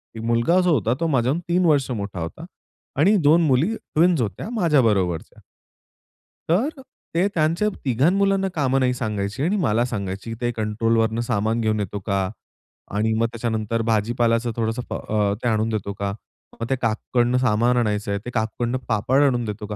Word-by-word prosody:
एक 110 - -6
मुलगा 115 +10 +2
जो 180 -1 +2
होता 115 -3 +1
तो 165 - 0
माझ्याहून 135 +2 +1
3 180 +1 +2
वर्ष 145 -5 +3
मोठा 100 -5 -4
होता. 80 0 -6 0.5
आणि 195 +8 +5
2 165 +3 +6
मुली 150 - +2
ट्विन्स 170 - +1
होत्या 110 - -4
माझ्याबरोबरच्या. 115 - +1 1.1
तर 205 - +2
अ, 270 - -10 0.3
ते 180 +4 +3
त्यांच्या 165 +6 +1 0.2
तिघां 130 +6 +3
मुलांना 195 -1 +2
कामं 135 -3 +1
नाही 125 -1 +2
सांगायची 105 0 -3
आणि 180 +6 +1
मला 115 -3 +2
सांगायची, 100 -3 -4
की - - -4
"ते 120 0 0
कंट्रोल 110 +1 0
वरनं 110 +1 +1
सामान 110 0 0
घेऊन 110 -1 0
येतो 100 0 -3
का? 95 -2 0 0.7
आणि 110 +2 +1
मग 115 - +2
त्याच्यानंतर 115 -1 -2
"भाजीपालाचं 115 +1 +1
थोडंसं 115 +1 -1
अ, 105 -2 0
ते - - +1
आणून 110 -1 +1
देतो 105 -2 -3
का?" 100 0 -1 0.5
मग 115 - -2
"ते 135 - +2
काकूकडनं 120 +2 +1
सामान 120 0 +2
आणायचं 105 -3 0
आहे, 100 - -1
ते - - -4
काकूकडनं 120 +1 -1
पापड 120 +5 +2
आणून 120 -4 +2
देतो 105 0 -5
का?"" 105 - -5
115 Hz, 175 wpm, -22 LUFS, 110-135 Hz, 1.1 s, 2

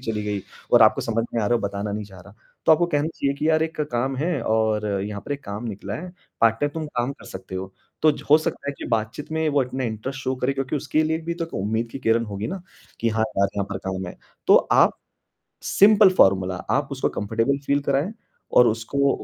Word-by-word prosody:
चली 110 -4 -3
गई 105 -1 -2 0.3
और 120 -1 +8
आपको 110 - +5
समझ 115 0 -1
में 115 - +1
आ - - +1
रहा 120 - +2
है - - -3
बताना 100 0 -3
नहीं 105 0 -3
चाह 95 -2 -13
रहा, 100 +3 -15 0.3
तो - - +8
आपको 170 +2 +3
कहना 150 -2 0
चाहिए 140 0 0
कि 155 +3 0
यार 160 0 +3
एक 160 -1 -3
काम 130 +3 0
है 155 0 -1
और 110 -1 +1 0.2
यहाँ 100 0 -5
पर 145 - -2
एक 140 - -6
काम 105 +3 -5
निकला 100 -2 -5
है, 180 +2 -7 0.3
पार्ट 115 -1 +5
टाइम 145 0 +1
तुम 160 -1 -3
काम 125 -2 -2
कर - - -16
सकते 95 0 -9
हो। 95 +1 -5 0.3
तो 155 - +6
ज 145 - -9
हो 150 - +9
सकता 155 -2 -4
है - - 0
कि - - -6
बात-चीत 115 +5 -2
में 160 0 +1
वो 145 -2 +2
अपने 125 0 -3
इंटरेस्ट 115 +5 -5
शो 130 0 -1
करे 130 +2 0
क्योंकि 135 +2 -2
उसके 150 +2 0
लिए 160 +1 0
भी 170 +1 -3
तो 170 - -3
क - - -13
उम्मीद 110 +4 -1
की 135 - -6
किरण 115 -1 +2
होगी 100 +1 -4
ना 190 +2 -5 0.4
कि 115 - +2
हाँ 110 0 +1
यार, 100 0 +4
यहाँ 100 - 0
पर 100 - -3
काम 95 -1 -3
है। - - -8 0.3
तो - - +8 0.2
आप - - +5 0.7
सिंपल 205 0 +6
फॉर्मूला 95 - +4 0.2
आप 140 0 +1
उसको 135 - 0
कंफर्टेबल 115 +6 -1
फील 140 0 +2
कराएँ 140 +9 0 0.4
और 125 - +8
उसको 135 +6 +1
120 Hz, 245 wpm, -23 LUFS, 105-145 Hz, 0.7 s, हो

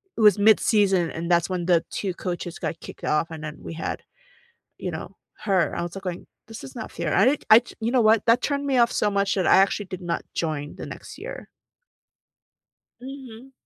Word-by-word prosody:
it - - -3
was 210 -1 +6
midseason, 205 -4 +4
and 170 +2 -3
that's 170 +1 +3
when 180 -2 -2
the 170 -2 +3
2 195 -3 -3
coaches 175 -1 -5
got 165 - -4
kicked - - -11
off, 155 +2 0
and 160 -1 -7
then 155 0 -6
we - - -8
had, 165 - -4 0.8
you - - -4
know, - - -7 0.2
her, 190 -5 +1
I - - -2
was, 175 +2 -6
like, 195 - -8
going, 180 -2 -5 0.2
"This 225 -6 -10
is 135 0 -11
not - - -7
fair." 170 -3 -3
I 200 - +4
did 275 +3 +2
I 220 - +11
j 240 - -9
you 225 +1 0
know 255 0 +3
what? 220 -1 +4
That 230 +2 +5
turned 285 +1 -1
me 270 -2 +2
off 235 0 +4
so 210 - +1
much 200 0 +1
that 190 -3 +1
I - - +7
actually 195 +1 +2
did 185 0 -7
not 170 -1 -2
join 150 -3 -3
the - - -7
next - - -10
year. - - -8 1.5
Mhm. 260 -1 -10
195 Hz, 220 wpm, -24 LUFS, 170-225 Hz, 1.5 s, I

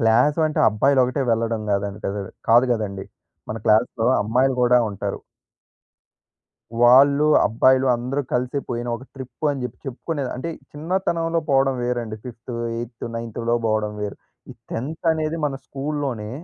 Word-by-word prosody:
Class 125 +7 +3
అంటే 155 - -4
అబ్బాయిలు 135 +6 +3
ఒకటే 130 +3 -1
వెళ్ళడం 115 -1 -1
కాదండి, 100 0 -2
కదూ 100 +1 -2 0.3
కాదు 120 +3 +6
కదండీ! 100 -4 -3 0.4
మన 110 - -3
క్లాస్‌లో 110 +1 +3 0.2
అమ్మాయిలు 125 +5 +2
కూడా 125 0 +5
ఉంటారు. 100 - -4 1.6
వాళ్ళూ, 140 +4 +6 0.2
అబ్బాయిలు 130 +4 +3
అందరూ 125 +4 -2
కలిసి 125 +3 0
పోయిన 120 0 -3
ఒక 130 - -12
ట్రిప్ 130 +2 -5
అని 135 -3 -3
చెప్పి 125 -1 -6
చెప్పుకునేది 135 +1 -4
అంటే 150 +7 -4 0.2
చిన్నతనంలో 165 +1 -1
పోవడం 135 0 +3
వేరండి. 120 -3 -2
ఫిఫ్త్, 120 0 -9 0.2
ఏయిత్తు, 115 0 -6
నైన్త్‌లో 115 0 -2
పోవడం 110 -1 0
వేరు. 105 -1 -4 0.3
ఈ - - -7 0.2
10త్ 150 +9 -5
అనేది 155 0 -2
మన 140 - -3
స్కూల్‌లోనే 135 -6 -3
125 Hz, 140 wpm, -22 LUFS, 115-140 Hz, 1.6 s, కాదు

